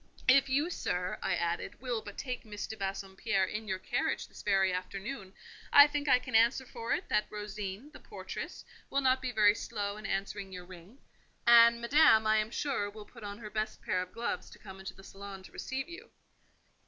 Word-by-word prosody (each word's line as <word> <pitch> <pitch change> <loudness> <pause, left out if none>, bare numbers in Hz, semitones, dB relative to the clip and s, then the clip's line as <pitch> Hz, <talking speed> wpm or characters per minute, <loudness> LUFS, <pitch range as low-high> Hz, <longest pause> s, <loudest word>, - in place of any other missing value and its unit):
"If 275 +1 +6
you, 290 +6 +1
sir," 180 - -2
I - - 0
added, 170 0 -2
"will 245 -3 -2
but 205 -1 -10
take 250 -2 -4
Miss 210 -2 -6
de 220 - -7
Bassompierre 195 0 -1
in 215 +3 -5
your 200 -3 -1
carriage 185 - -1
this - - -12
very 195 -2 +2
afternoon, 195 +3 -5 0.4
I 285 - +10
think 295 -1 -2
I 250 - +7
can 250 - -8
answer 235 +4 +4
for 230 -1 -6
it - - -2
that 210 - +2
Rosine, 210 +4 -6
the - - -12
portress, - - -7 0.2
will 275 - +1
not 260 -1 +3
be 255 -1 -2
very 210 -3 +5
slow 205 -1 -4
in 215 -1 -6
answering 195 0 -3
your 180 -1 -8
ring; 185 +6 -13 0.5
and 235 0 +8
Madame, 235 -3 +5
I 215 0 +4
am 215 0 0
sure, 250 -5 -1
will 210 0 -11
put 230 0 -14
on 205 0 -6
her 210 -2 -9
best 215 +1 -3
pair 180 - 0
of 180 - -7
gloves 235 +1 -3
to - - -14
come 190 -3 -11
into 190 - -7
the 195 - -14
salon 195 -1 -9
to - - -13
receive 265 0 -4
you." 340 +1 -10
215 Hz, 205 wpm, -31 LUFS, 195-245 Hz, 0.5 s, I